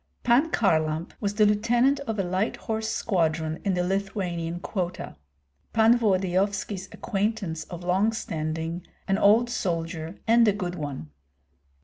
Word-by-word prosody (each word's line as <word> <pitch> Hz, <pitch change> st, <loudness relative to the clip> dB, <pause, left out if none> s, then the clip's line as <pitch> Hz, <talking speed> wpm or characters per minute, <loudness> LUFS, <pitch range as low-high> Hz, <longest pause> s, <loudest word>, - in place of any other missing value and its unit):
Pan 250 Hz, +7 st, +4 dB
Kharlamp 160 Hz, -, +1 dB
was 205 Hz, 0 st, -2 dB
the 215 Hz, 0 st, +5 dB
lieutenant 235 Hz, +6 st, +3 dB
of 225 Hz, -, -2 dB
a 195 Hz, -, +1 dB
light 185 Hz, +4 st, -1 dB
horse 220 Hz, 0 st, -3 dB
squadron 160 Hz, -6 st, 0 dB
in 195 Hz, -3 st, +1 dB
the 180 Hz, -, +1 dB
Lithuanian 180 Hz, -3 st, -2 dB
quota. 180 Hz, -1 st, -4 dB, 0.6 s
Pan 225 Hz, +1 st, +5 dB
Volodyovski's 195 Hz, -2 st, 0 dB
acquaintance 200 Hz, -6 st, -2 dB
of 175 Hz, -1 st, -8 dB
long 190 Hz, +5 st, +2 dB
standing, 165 Hz, -4 st, -3 dB, 0.3 s
an 195 Hz, +1 st, +1 dB
old 220 Hz, +4 st, +5 dB
soldier 165 Hz, -3 st, -3 dB
and 230 Hz, 0 st, +5 dB
a 210 Hz, -, +4 dB
good 180 Hz, -3 st, -3 dB
one. 145 Hz, -, -6 dB
190 Hz, 135 wpm, -26 LUFS, 170-220 Hz, 0.6 s, the